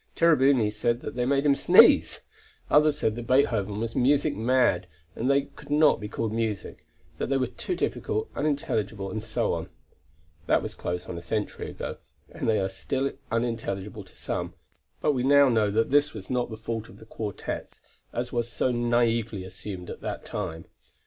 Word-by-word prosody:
Cherubini 135 -9 +4
said 120 +3 0
that - - -6
they 125 0 -1
made 140 +1 +2
him 145 - +6
sneeze. - - +6 0.5
Others 150 0 +5
said 110 -8 0
that 120 0 -6
Beethoven 105 -6 +2
was 115 0 -3
music 145 +3 +3
mad, 115 -6 +2 0.3
that 115 - -4
they 140 0 +3
could - - -15
not 150 +1 +4
be 105 - -5
called 110 0 -3
music, 110 -4 -3 0.3
that - - -2
they 135 - +2
were 130 - +1
too 125 - -4
difficult, 435 +5 -2
unintelligible, 110 -9 -1
and 110 +1 -4
so 110 0 -1
on. - - -4 0.8
That - - +3
was - - -5
close 90 0 -4
onto 85 - -6
a - - -10
century 105 +4 -3
ago, - - -6 0.3
and - - -3
they 110 - +3
are 95 - 0
still 135 +8 -2 0.2
unintelligible 115 -4 -2
to - - -18
some, 85 +1 -4 0.5
but - - +3
we 130 -3 -1
now 140 +1 +6
know 110 -3 +3
that 115 +4 +1
this 145 -1 +3
is 100 +1 -8
not 125 -1 0
the 110 - -7
fault 110 0 -4
of - - -14
the 110 - -14
quartets 110 -2 -5 0.3
as 120 +2 -4
was 120 -1 -1
so 130 - 0
naively 115 -3 +1
assumed 95 -1 -7
at - - -9
that - - -5
time. 85 -6 -5
115 Hz, 185 wpm, -27 LUFS, 105-135 Hz, 0.8 s, him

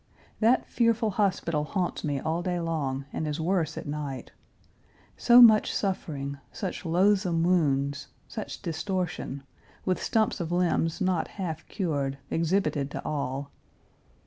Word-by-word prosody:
That 230 +3 +4
fearful 230 -2 +1
hospital 185 -6 0
haunts 180 +3 -2
me 145 -2 -1
all 160 +4 -1
day 175 -1 -1
long, 145 -5 -2
and 155 - -2
is 150 +1 -3
worse 165 -1 0
at - - -5
night. 145 -4 -5 0.8
So 245 +1 +8
much 220 -2 +6
suffering, 140 -8 -3
such 190 -1 -5
loathsome 180 -1 +3
wounds, 140 -5 +1 0.2
such 215 -2 -7
distortion, 175 -5 -3 0.4
with 185 -1 0
stumps 220 -3 +1
of 170 -1 -3
limbs 175 -1 +1
not 185 -3 +1
half 165 -5 -5
cured, 140 -8 -2
exhibited 165 -4 +1
to - - -6
all. 140 -1 -3
170 Hz, 130 wpm, -27 LUFS, 145-190 Hz, 0.8 s, So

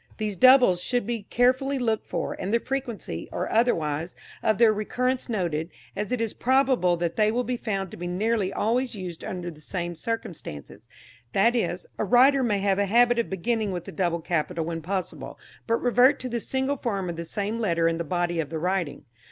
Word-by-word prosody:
These 215 -2 -2
doubles 250 -5 +6
should 245 +2 0
be 230 -3 -4
carefully 260 +3 +2
looked 225 -4 -1
for, - - -3
and 190 - -3
the 235 - +3
frequency, 235 - -4
or - - -2
otherwise, 165 -8 +1 0.3
of 215 -2 +2
their 225 -2 +5
recurrence 250 +5 -1
noted, 170 -7 -1 0.3
as 205 +3 -3
it 250 - 0
is 225 -2 -1
probable 260 -9 +2
they 175 +6 +1
will 245 +2 0
be 250 0 -2
found 195 -6 -3
to - - -9
be 175 - -5
nearly 200 +2 0
always 240 +4 0
used 180 -4 -7
under 175 -2 -4
the 155 -2 -15
same 175 +1 -4
circumstances; 175 - -6 0.4
that 230 +5 +4
is, 180 -6 -1
a - - +1
writer 260 +6 +5
may 220 -5 +1
have 195 -1 +2
a 200 - +2
habit 240 +3 +4
of 235 - -1
beginning 215 +2 -1
with 175 -2 -5
a - - -6
double 170 -3 -1
capital 165 0 -1
when 165 0 -4
possible, 185 +3 -4 0.3
but 230 - +3
revert 250 +4 +4
to 255 - -4
the 235 0 -2
single 265 +4 -1
form 200 -7 -2
of 170 - -3
the 170 - -5
same 205 +6 -3
letter 170 -6 +2
in 165 0 0
the - - -1
body 175 0 -1
of 150 -3 -2
the 160 - -4
writing. 175 -3 -2
205 Hz, 200 wpm, -26 LUFS, 175-240 Hz, 0.4 s, doubles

